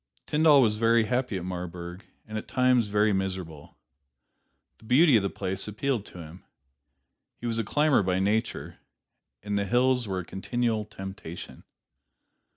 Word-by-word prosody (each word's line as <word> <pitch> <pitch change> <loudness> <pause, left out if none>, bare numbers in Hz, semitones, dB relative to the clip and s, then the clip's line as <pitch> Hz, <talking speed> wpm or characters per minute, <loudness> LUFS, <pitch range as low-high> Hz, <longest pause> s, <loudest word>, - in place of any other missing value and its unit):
Tyndall 150 -3 +5
was 105 -2 +1
very 115 +1 +4
happy 125 -2 -1
at 90 - -6
Marburg, 90 0 -6 0.2
and 110 - -8
at 110 - -5
times 125 -3 +2
very 105 +1 +2
miserable. 95 -6 -4 1.0
The - - -18
beauty 135 +4 +5
of 110 - +5
the 100 - -1
place 95 +2 -3
appealed 110 +1 -2
to - - -13
him. 85 +1 -11 0.9
He - - -9
was 115 -1 -1
a - - 0
climber 145 +4 +2
by 90 -1 0
nature, 105 +4 -1 0.6
and 100 0 -1
the 100 - -1
hills 125 +1 +2
were 95 -1 -2
a - - -11
continual 110 +3 -2
temptation. 95 -4 -9
105 Hz, 155 wpm, -27 LUFS, 95-120 Hz, 1.0 s, Tyndall